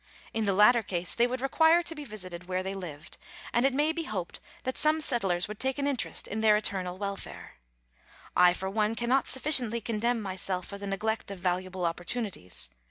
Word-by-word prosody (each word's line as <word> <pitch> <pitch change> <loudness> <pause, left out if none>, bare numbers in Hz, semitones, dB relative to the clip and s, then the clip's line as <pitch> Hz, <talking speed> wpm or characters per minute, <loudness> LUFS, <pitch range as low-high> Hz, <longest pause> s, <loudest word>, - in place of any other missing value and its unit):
In 225 -1 0
the 200 - +2
latter 230 +4 +6
case 180 -4 -1
they 240 +1 +3
would 255 +1 -4
require 320 +5 +4
to 335 - -3
be 300 -2 -8
visited 185 -6 -7
where 185 0 -1
they 190 +1 -3
lived, 170 -5 -8 0.3
and 240 +3 +4
it 270 - -1
may 300 +3 +3
be 330 0 -4
hoped 185 - -4 0.2
that 260 - -2
some 310 +1 +2
settlers 195 - +1
would 210 0 -8
take 265 +1 0
an 280 - -1
interest 280 -4 -1
in 215 +2 -3
their 215 -1 +5
eternal 185 -4 -1
welfare. 200 0 -6 0.8
I, 180 0 +6
for 190 - -4
one, 215 +2 0
cannot 245 +3 +1
sufficiently 255 -4 +3
condemn 230 +2 0
myself 185 -2 -3
for 200 - -7
the 200 - -6
neglect 215 +3 -2
of 200 - -6
valuable 180 0 -2
opportunities. 170 - -3
210 Hz, 195 wpm, -29 LUFS, 185-245 Hz, 0.8 s, latter